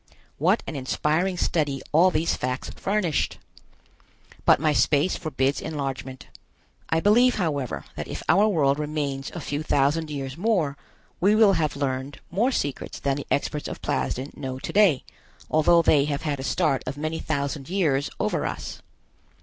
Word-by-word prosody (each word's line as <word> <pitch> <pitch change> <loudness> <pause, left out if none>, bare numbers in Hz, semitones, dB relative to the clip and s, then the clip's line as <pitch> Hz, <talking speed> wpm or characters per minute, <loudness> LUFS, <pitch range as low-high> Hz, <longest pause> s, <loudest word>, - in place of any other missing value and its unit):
What 185 +9 +2
an 160 - -6
inspiring 155 +7 0
study 145 -6 0
all 170 +5 +6
these 165 -1 0
facts 125 +1 -3
furnished! 190 -6 -1 1.1
But - - +6
my 155 0 +2
space 150 +4 +2
forbids 140 -4 -1
enlargement. 135 -4 -5 0.6
I 165 - +2
believe, 240 +7 +4
however, 145 - -2
that - - -5
if - - -6
our 205 +3 +5
world 145 -8 +2
remains 145 -3 -3
a - - -3
few 145 -1 -3
thousand 150 +2 +1
years 135 -1 -5
more, 180 -8 +1 0.4
we 200 +5 +4
will 215 -2 +6
have 155 -4 0
learned 135 0 -3
more 225 +9 +2
secrets 145 - -3
than 140 0 0
the 145 - -6
experts 145 +1 -1
of - - -7
Plasden 130 +3 -2
know 130 -2 -5
to - - -6
day, 195 -10 +4 0.5
although 165 +2 +5
they 145 -3 +4
have 145 0 -3
had 145 -3 -2
a - - -4
start 150 -2 +1
of 135 +2 -4
many 155 +2 -3
thousand 140 -1 -3
years 155 -8 +1
over - - 0
us. - - -6
150 Hz, 160 wpm, -25 LUFS, 140-175 Hz, 1.1 s, all